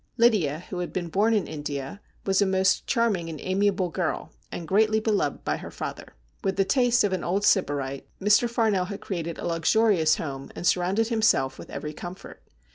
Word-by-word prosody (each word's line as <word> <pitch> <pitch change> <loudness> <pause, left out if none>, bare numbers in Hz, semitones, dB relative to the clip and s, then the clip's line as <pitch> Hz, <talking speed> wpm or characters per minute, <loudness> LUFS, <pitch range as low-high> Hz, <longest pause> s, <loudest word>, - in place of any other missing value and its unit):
Lydia, 195 - +3
who 180 - -3
had 175 - -3
been 175 -2 -3
born 205 +7 +2
in 205 - +1
India, 145 +3 -5 0.2
was 195 0 +2
a - - +4
most 190 0 +2
charming 215 -9 +1
and 155 -2 -6
amiable 190 0 +1
girl, 170 -1 -3 0.2
and 170 - -6
greatly 215 +3 +3
beloved 210 -9 0
by - - -1
her - - -8
father. - - -7 0.3
With 195 - 0
the 195 - +2
tastes 245 +1 +3
of 200 -2 +1
an 185 - -2
old 195 +4 0
Sybarite, 140 -6 +1
Mr. 210 +4 +4
Farnell 220 -6 +1
had 200 +1 -6
created 170 -4 -4
a - - -6
luxurious 170 0 +3
home, 135 -3 -6
and - - -6
surrounded 190 +6 +2
him 225 -2 0
self 135 -11 +2
with - - -10
every 150 0 -5
comfort. 175 +4 -9
190 Hz, 195 wpm, -26 LUFS, 165-210 Hz, 0.3 s, a